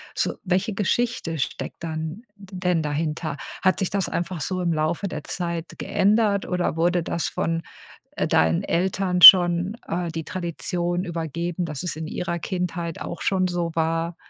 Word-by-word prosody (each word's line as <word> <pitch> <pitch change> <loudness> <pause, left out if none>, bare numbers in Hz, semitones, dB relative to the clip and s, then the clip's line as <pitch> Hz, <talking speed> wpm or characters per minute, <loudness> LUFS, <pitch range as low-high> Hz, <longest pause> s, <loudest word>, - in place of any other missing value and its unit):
so - - 0
welche 190 +3 0
Geschichte 205 -5 -1
steckt 130 +5 -4
dann 160 +6 -5
d 195 -2 -13
denn 180 -3 +1
dahinter? 150 0 -3 0.2
Hat 185 -4 +3
sich 190 - -1
das 195 -1 -1
einfach 170 -1 -3
so 185 +2 -2
im 170 -1 +1
Laufe 160 +5 -1
der 155 -4 -6
Zeit 170 -2 -4
geändert 205 -1 +1
oder 180 -3 -1
wurde 175 +1 +1
das 170 - -2
von, 165 0 -2 0.5
äh, - - 0
deinen 80 +1 +2
Eltern 180 0 0
schon, 175 +4 +9
äh, 175 +1 -2
die 160 0 -4
Tradition 175 0 -3
übergeben, 170 0 -3
dass 150 -1 -5
es 175 - -3
in 160 0 -5
ihrer 170 0 -3
Kindheit 175 -2 -3
auch 170 - -6
schon 185 -1 +1
so 175 -1 -2
war? 165 +1 -1
175 Hz, 165 wpm, -24 LUFS, 165-185 Hz, 0.5 s, schon